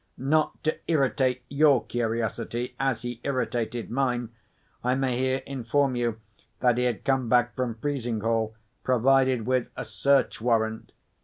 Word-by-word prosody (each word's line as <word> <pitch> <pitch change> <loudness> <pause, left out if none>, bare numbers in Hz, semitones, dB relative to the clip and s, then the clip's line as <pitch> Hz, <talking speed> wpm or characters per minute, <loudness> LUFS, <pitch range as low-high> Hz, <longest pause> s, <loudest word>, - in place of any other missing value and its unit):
(Not 150 +4 0
to 155 - +1
irritate 130 -4 +1
your 140 -2 +4
curiosity, 120 +1 -2
as 130 -4 0
he 120 -1 -5
irritated 120 -4 -2
mine, 125 -2 0 0.5
I 125 +1 +2
may 130 -2 0
here 130 +1 0
inform 135 +1 0
you 120 -2 -1 0.4
that 125 -1 +3
he 125 - +2
had 120 -4 -2
come 130 -3 +1
back 120 0 +3
from 125 -3 -2
Frizinghall 115 -4 -1 0.3
provided 130 -1 +3
with 130 0 0
a - - -5
search 140 -5 +1
warrant. 110 -2 0
125 Hz, 140 wpm, -26 LUFS, 115-135 Hz, 0.5 s, your